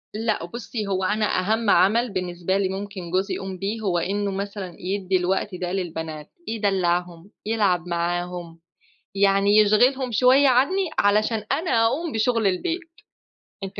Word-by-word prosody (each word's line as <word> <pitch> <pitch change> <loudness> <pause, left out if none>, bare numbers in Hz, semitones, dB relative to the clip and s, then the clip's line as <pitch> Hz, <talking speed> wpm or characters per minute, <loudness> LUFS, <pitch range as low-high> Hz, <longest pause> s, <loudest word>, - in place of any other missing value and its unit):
لأ 215 -5 -1
بُصّي 215 +2 -5
هو 190 -1 -1
أنا 210 +3 +1
أهم 220 +3 0
عمل 225 +3 +3
بالنسبة 180 0 -2
لي 195 -1 0
ممكن 190 -2 -6
جوزي 190 +2 0
يقوم 190 -1 -6
بيه، 205 +4 -3
هو 190 -5 0
إنّه 200 +3 -1
مثلًا 195 -2 -5
يدّي 190 0 -1
الوقت 185 +2 -1
ده 180 0 -4
للبنات، 160 -5 -5 0.2
يدلّعهم، 180 -4 -1
يلعب 200 -6 +1
معاهم، 175 0 -3 0.6
يعني 200 +1 +3
يشْغِلهم 245 +5 +3
شويّة 255 +5 +5
عنّي 315 +9 +2
علشان 215 +2 +2
أنا 235 -9 +2
أقوم 305 +7 -1
بشغل 225 0 +1
البيت، 325 - 0 0.8
أنتِ 195 +1 -6
200 Hz, 140 wpm, -23 LUFS, 180-220 Hz, 0.8 s, شويّة